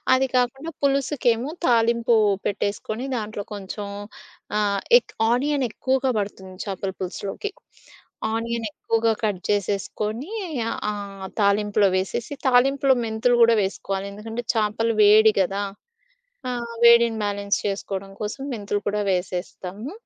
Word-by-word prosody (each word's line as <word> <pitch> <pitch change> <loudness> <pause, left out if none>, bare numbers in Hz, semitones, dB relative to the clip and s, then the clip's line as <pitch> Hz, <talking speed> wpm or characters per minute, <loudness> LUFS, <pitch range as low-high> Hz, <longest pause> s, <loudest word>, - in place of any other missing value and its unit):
అది 265 +1 +2
కాకుండా 270 +6 -1
పులుసుకేమో 270 -2 +1 0.2
తాలింపు 235 0 +3 0.3
పెట్టేసుకొని 210 +4 -2
దాంట్లో 210 -2 -5
కొంచెం 200 +1 -6 0.7
ఆహ్, 200 -1 +1 0.2
ఎక్ - - -20 0.2
ఆనియన్ 275 +2 +1
ఎక్కువగా 265 +2 0
బడుతుంది 190 -2 -6
చేపల 195 0 -3
పులుసులోకి. 195 - -4 0.8
ఆనియన్ 230 0 -2
ఎక్కువగా 225 +2 +1
కట్ 205 -3 +1
జేసేసుకొని 210 - -2 0.4
ఆహ్, - - -3
ఆ 200 -2 -6
తాలింపులో 205 0 +3
వేసేసి, 215 +7 -3
తాలింపులో 270 +2 +4
మెంతులు 225 +2 +2
గూడా 230 0 +7
వేసుకోవాలి. 195 0 -3
ఎందుకంటే, 225 +3 -5
చేపలు 225 +1 +1
వేడి 215 +1 +7
గదా! 195 +2 +1 0.9
ఆ! - - -1 0.3
వేడిని 235 -1 +6
బ్యాలెన్స్ 200 0 0
చేసుకోవడం 195 -1 -3
కోసం 215 +6 -4
మెంతులు 205 -3 -2
కూడా 210 +1 0
వేసేస్తాము. 185 +5 -3
215 Hz, 115 wpm, -24 LUFS, 200-240 Hz, 0.9 s, గూడా